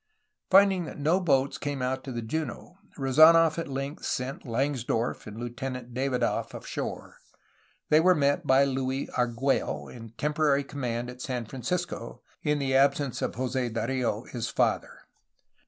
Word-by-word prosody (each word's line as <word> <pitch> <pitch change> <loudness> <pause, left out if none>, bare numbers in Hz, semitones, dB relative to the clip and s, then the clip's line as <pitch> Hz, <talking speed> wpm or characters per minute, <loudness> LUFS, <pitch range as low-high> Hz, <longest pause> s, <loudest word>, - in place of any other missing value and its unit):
Finding 190 -2 +5
that - - -8
no 155 +6 +2
boats 140 -6 +1
came 145 -1 -3
out 130 +1 -1
to 135 - -5
the 120 -2 -4
JunOy 155 +7 -4 0.2
Rezd 135 0 -1 0.2
nof 165 0 +3
at 165 - -3
length 140 +2 -5
sent 130 +1 -3
Langsdorff 120 -2 -1
and 105 0 -8
Lieutenant 125 +1 -5
Davidoff 130 0 -1
ashore. - - -6 0.7
They 155 - +6
were 180 +2 +5
met 140 -2 +1
by 130 +1 +6
Luis 135 0 -2
Argtiello, 125 +2 -1
in 115 -2 -9
temporary 150 -1 +2
conunand 125 -3 -4
at 125 0 -12
San 125 -3 -3
Francisco, 165 +10 -4 0.2
in 150 -1 +1
the 135 -2 -1
absence 140 -1 +2
of - - -2
Jose 130 0 -1
Dario, 115 -1 -1
his 120 -3 -5
father. - - 0
135 Hz, 150 wpm, -28 LUFS, 125-145 Hz, 0.7 s, They